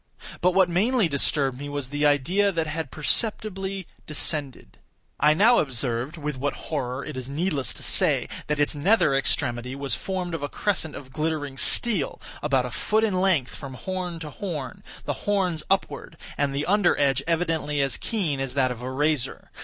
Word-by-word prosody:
But 180 0 +3
what 190 -2 +5
mainly 205 +5 +2
disturbed 140 -2 +1
me 145 0 -5
was 145 -3 -3
the 145 +1 +2
idea 175 +9 +2
that 165 -3 -1
had 155 -2 -4
perceptibly 195 - -1 0.2
descended. 150 -3 -2 0.4
I 150 +1 +5
now 230 +8 +6
observed—with 135 +3 -2
what 140 +2 -1 0.2
horror 130 -3 -2
it 150 - -6
is 130 0 -5
needless 145 - 0
to - - -7
say—that 150 0 +2
its 145 - +3
nether 155 0 +3
extremity 125 -2 0
was 140 0 -2
formed 185 -2 -3
of 165 - -3
a 145 - -3
crescent 175 -7 -1
of 130 -2 -10
glittering 155 -3 -2
steel, 180 - +3 0.2
about 135 -4 +1
a 125 - -5
foot 215 - +1
in 190 -4 +1
length 170 -10 +2
from 135 -3 -8
horn 180 +2 -4
to 150 -2 -6
horn; 150 -11 -5 0.2
the - - -1 0.2
horns 185 -6 +1
upward, 195 -3 -1 0.2
and 140 -1 0
the 145 +2 -1
under 200 -1 +3
edge 135 -2 +2
evidently 160 -3 0
as 135 -1 +1
keen 180 - -2
as 135 -1 -3
that 130 -2 +2
of 120 -1 -6
a 125 - -4
razor. 145 0 -1
150 Hz, 175 wpm, -25 LUFS, 135-180 Hz, 0.4 s, now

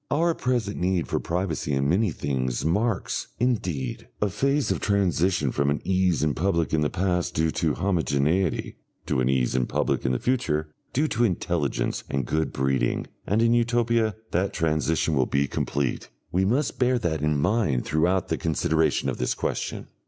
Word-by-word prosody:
Our 165 +3 +2
present 120 -8 -1
need 90 -1 0
for - - -1
privacy 85 -4 -2
in 70 0 +1
many 95 +7 +2
things 65 -4 -2
marks, 105 +4 0
indeed, 100 - -1
a 105 -2 0
phase 140 +7 +1
of - - 0
transition 90 -6 +1
from 70 +1 +1
an 70 - 0
ease 95 -4 +1
in 75 -2 +2
public 85 -1 0
in 80 - +2
the 75 - +1
past 90 -1 -1
due 80 +1 +2
to 80 -2 0
homogeneity, 85 -1 0 0.3
to - - 0
an 65 - +1
ease 65 -2 +1
in 65 -1 +1
public - - 0
in 65 - +1
the 65 - +1
future 80 - -1 0.2
due 150 +4 +1
to 120 - +1
intelligence 85 -7 -1
and 70 -2 -1
good 80 +5 -1
breeding, 65 -2 0 0.2
and 110 +3 +2
in 115 0 +4
Utopia 115 -2 +2 0.2
that 95 +3 0
transition 80 0 +1
will 65 -4 +2
be 70 0 +1
complete. 70 0 -2 0.2
We 95 +2 +2
must 130 +8 0
bear 125 0 +3
that 80 -9 -1
in 75 -1 +1
mind 80 - +1
throughout 85 +5 +1
the - - -1
consideration 80 -1 +1
of - - -2
this - - 0
question. - - -3
85 Hz, 175 wpm, -25 LUFS, 75-105 Hz, 0.3 s, in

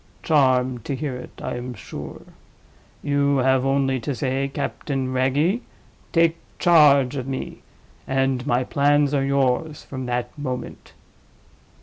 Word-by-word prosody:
"Charmed 130 -6 +2
to 140 - -2
hear 130 -1 -3
it, 125 - -10
I - - -3
am 125 0 -6
sure. - - -9 0.8
You 140 -1 +2
have 130 0 +3
only 135 -1 +1
to 130 +4 -3
say, 135 +1 -1
'Captain 135 -1 -3
Wragge, 145 - +1 0.5
take 165 -1 +3 0.2
charge 145 -6 +5
of 130 -1 -4
me'—and 135 0 -4
my 125 0 +2
plans 145 +1 +2
are 140 -2 +2
yours 140 +2 0
from 130 -2 -6
that 125 0 -3
moment." 130 -3 -6
135 Hz, 125 wpm, -23 LUFS, 130-145 Hz, 0.8 s, charge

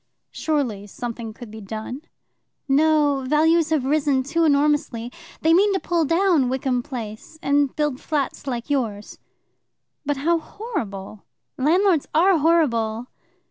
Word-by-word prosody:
"Surely 250 -10 -2
something 230 +1 -6
could 230 0 -11
be 220 0 -9
done." 220 +6 -6 0.7
"No; 290 -1 +3
values 320 +2 +3
have 305 -5 +1
risen 285 -2 +1
too 320 +5 0
enormously. 285 -5 +1 0.3
They 320 +1 +4
mean 400 +4 +4
to 380 - +1
pull 340 -3 0
down 330 -5 +2
Wickham 255 -1 0
Place, 235 +3 -8
and 285 -1 +2
build 295 -4 -1
flats 285 -2 -3
like 240 -3 -3
yours." 230 -8 -3 0.8
"But 290 -1 -1
how 335 +4 +1
horrible!" 220 - -6 0.3
"Landlords 335 +3 +2
are 355 +1 +4
horrible." 245 -8 +1
285 Hz, 130 wpm, -22 LUFS, 240-320 Hz, 0.8 s, They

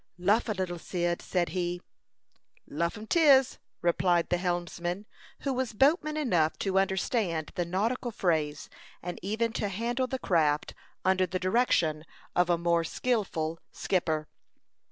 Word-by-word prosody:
"Luff 205 +6 +2
a - - +1
little, 185 -3 -3
Cyd," 175 0 -2
said 175 -2 0
he. 175 -1 -2 0.9
"Luff 170 +7 -2
'em 215 - -8
'tis," 270 -2 +5 0.2
replied 175 0 +2
the 175 - +2
helmsman, 175 +1 -2 0.4
who 275 - -1
was 255 -3 -2
boatman 305 - +3
enough 175 - +1
to 190 -1 +1
understand 190 - 0
the 175 - -1
nautical 220 +8 -1
phrase, 155 -8 -1 0.4
and 175 0 -5
even 220 +4 -1
to 210 - -1
handle 235 +6 -1
the 265 - -2
craft 155 -10 +1 0.3
under 185 0 +3
the 185 - -2
direction 185 -6 +2 0.3
of 180 0 +3
a 175 - +3
more 170 0 +2
skilful 165 -6 -1
skipper. 160 -5 -1
185 Hz, 140 wpm, -29 LUFS, 170-225 Hz, 0.9 s, tis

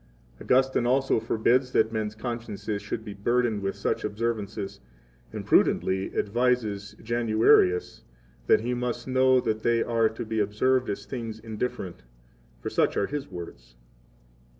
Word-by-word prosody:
Augustine 130 -1 +2
also 135 -1 +2
forbids 120 +3 +1
that 110 0 +3
men's 110 -1 -3
consciences 110 -3 -4
should 110 - -5
be 105 - -6
burdened 120 +2 +1
17 - - -9
with 95 0 -2
such 100 - -2
observances, 105 -2 -3 0.5
and - - -6
prudently 95 +1 +2
advises 105 -3 0
Januarius 110 -5 +3 0.5
that - - +5
he 120 +2 -1
must 120 0 -3
know 130 0 +4
that 110 -3 -1
they 115 0 +2
are 115 -1 +2
to 110 +1 -6
be 110 0 -2
observed 125 +5 +1
as 100 - -4
things 115 -4 -5
indifferent; 110 -3 -5 0.6
for - - -4
such - - +1
are 100 - +2
his 145 +2 -5
words. - - -10
115 Hz, 145 wpm, -27 LUFS, 105-125 Hz, 0.6 s, that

